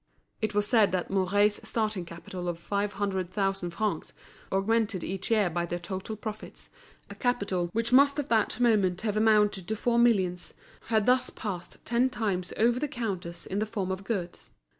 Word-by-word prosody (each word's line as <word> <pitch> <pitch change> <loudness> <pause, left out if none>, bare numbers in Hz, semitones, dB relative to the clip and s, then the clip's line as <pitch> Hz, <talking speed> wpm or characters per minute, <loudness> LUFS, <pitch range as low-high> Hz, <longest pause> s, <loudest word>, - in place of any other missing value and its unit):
It 215 -1 -1
was 205 0 +3
said 220 -2 +4
that 185 0 -1
Mouret's 205 +2 +2
starting 215 -5 -1
capital 175 +1 -6
of 170 - -3
five 200 +4 -2
hundred 190 -3 -2
thousand 195 -2 -1
francs, 205 +5 -2 0.4
augmented 205 -1 +1
each 190 0 -4
year 215 -4 +3
by 175 0 -2
the 175 - -2
total 190 +4 -5
profits, 215 0 -8 0.4
a - - -5
capital 200 -8 -1
which 230 +3 -1
must 280 +2 +6
at 290 - -2
that 225 +1 +1
moment 205 -7 +3
have 215 -2 -1
amounted 210 -4 +3
to 220 - -1
four 235 +2 +1
millions, 190 -7 +2 0.3
had 220 -2 +2
thus 255 0 +3
passed 180 -6 -6
ten 240 +3 +2
times 195 -8 -2
over 235 +2 +3
the 300 - -1
counters 185 -9 -4
in 195 - -2
the 215 - -1
form 195 -4 -3
of 190 +1 -4
goods. 190 -4 -4
205 Hz, 180 wpm, -28 LUFS, 185-225 Hz, 0.4 s, must